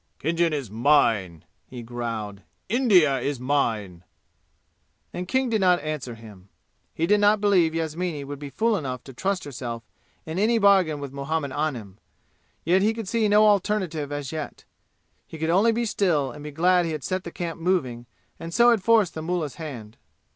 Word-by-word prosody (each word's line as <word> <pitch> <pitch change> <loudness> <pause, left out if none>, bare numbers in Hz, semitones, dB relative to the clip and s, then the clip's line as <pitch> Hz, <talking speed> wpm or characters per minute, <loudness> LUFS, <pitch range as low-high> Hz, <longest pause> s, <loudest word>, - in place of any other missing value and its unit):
"Khinjan 165 +2 0
is 140 -9 -4
mine!" 110 - +2 0.2
he 125 -2 -9
growled. 115 -4 -5 0.3
"India 190 - +4
is 140 +1 -3
mine!" 110 -10 -1 1.1
And 180 0 -5
King 260 +5 +1
did 220 -3 0
not 180 -1 +4
answer 145 -6 -5
him. 105 -4 -14 0.4
He 165 - -1
did 210 +4 +3
not 205 +1 +4
believe 185 -6 +3
Yasmini 165 -1 -3
would 140 0 -7
be 145 -1 -7
fool 220 - +1
enough 130 -6 -5
to 135 - -11
trust 190 +8 -2
herself 120 -4 -6 0.4
in 160 +3 -4
any 225 +3 +3
bargain 190 -8 +4
with 140 -2 -7
Muhammad 140 +1 -3
Anim. 125 -10 -4 0.6
Yet 180 +4 +3
he 220 +3 +2
could 225 -3 -6
see 230 0 +1
no 210 +1 +5
alternative 190 -7 +1
as 145 -2 -4
yet. 155 -2 -6 0.6
He 160 - -9
could 160 +1 -1
only 205 +6 +4
be 235 +1 -1
still 165 - 0
and 145 +4 -11
be 150 - -6
glad 175 +4 +2
he 165 - -3
had 150 -3 -5
set 185 0 -2
the - - -6
camp 165 -1 -5
moving 130 -10 -1 0.3
and 165 - -7
so 240 0 +6
had 225 -4 +2
forced 215 -2 +3
the 160 - -5
mullah's 160 -5 -3
hand. 120 -8 -8
160 Hz, 180 wpm, -24 LUFS, 130-190 Hz, 1.1 s, so